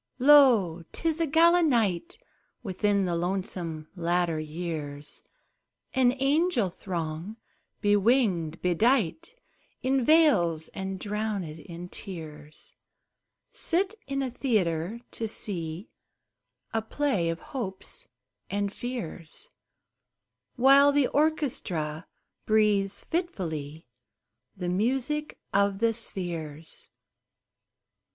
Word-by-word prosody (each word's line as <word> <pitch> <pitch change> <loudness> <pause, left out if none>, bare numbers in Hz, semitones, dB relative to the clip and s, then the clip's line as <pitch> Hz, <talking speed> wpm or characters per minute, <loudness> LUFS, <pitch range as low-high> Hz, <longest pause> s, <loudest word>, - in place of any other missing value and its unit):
Lo! 250 - +6
'tis 330 -1 -1
a 325 - +2
gala 335 +4 +5
night 240 - +1 0.5
Within 200 -1 +1
the 175 -1 0
lonesome 175 -3 -2
latter 175 -2 0
years! 155 -2 -5 0.7
An 255 -2 +4
angel 275 - +2
throng, 170 +3 -5 0.5
bewinged, 205 - +2
bedight 230 - +1 0.5
In 265 0 +2
veils, 200 - +4
and 190 0 -5
drowned 210 0 -2
in 165 +3 -8
tears, 155 -6 -9 0.8
Sit 375 +4 0
in 275 0 -1
a 260 - -3
theatre, 210 - 0
to 225 - -3
see 175 -3 -3 0.8
A 225 - +1
play 220 -7 0
of 165 0 -3
hopes 195 -8 -5 0.4
and 200 0 -1
fears, 245 - -6 1.0
While 275 +3 +7
the 285 -1 +3
orchestra 220 - 0 0.4
breathes 205 -2 +2
fitfully 165 - -3 0.7
The 180 -2 -2
music 265 +10 -1 0.2
of 200 0 +3
the 230 +2 +2
spheres. 165 -8 -4
200 Hz, 90 wpm, -28 LUFS, 170-265 Hz, 1.0 s, While